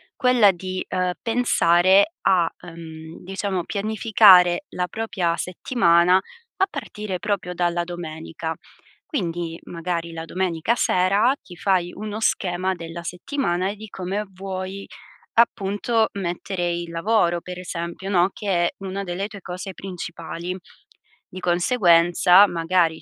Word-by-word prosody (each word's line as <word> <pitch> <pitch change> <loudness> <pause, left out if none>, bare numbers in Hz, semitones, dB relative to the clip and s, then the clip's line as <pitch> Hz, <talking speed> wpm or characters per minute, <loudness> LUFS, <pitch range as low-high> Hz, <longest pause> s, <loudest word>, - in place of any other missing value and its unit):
quella 250 -6 +5
di, 185 +1 -5
uhm, 180 -1 0
pensare 200 - +3
a, 175 -3 +3
uhm, 165 -2 -10
diciamo, 190 -1 -3
pianificare 205 -1 +5
la 180 0 -2
propria 185 -6 -1
settimana 180 -2 +3
a 465 - -4
partire 210 - -5
proprio 185 -3 -2
dalla 175 -1 0
domenica. 165 -1 -6 0.5
Quindi, 170 - -3
magari 170 -1 -4
la 165 0 -6
domenica 180 +4 -1
sera 200 +5 +3
ti 180 - -13
fai 180 -2 +1
uno 210 +1 -5
schema 185 -3 0
della 165 0 -8
settimana 180 - -2
e 205 - -5
di 215 +1 -10
come 195 +2 -3
vuoi 190 +1 -6 0.5
appunto 220 0 +2
mettere 175 -1 -3
il 170 0 -4
lavoro, 175 -1 +1
per 180 +1 -8
esempio, 170 +1 -5
no, 180 -1 +3
che 210 - -8 0.2
è - - -16
una 195 0 -4
delle 185 +2 -3
tue 205 -2 -11
cose 185 +2 -6
principali. 170 -1 -6 0.7
Di 185 - -9
conseguenza, 175 0 +5
magari 165 -1 +1
180 Hz, 125 wpm, -23 LUFS, 170-200 Hz, 0.7 s, quella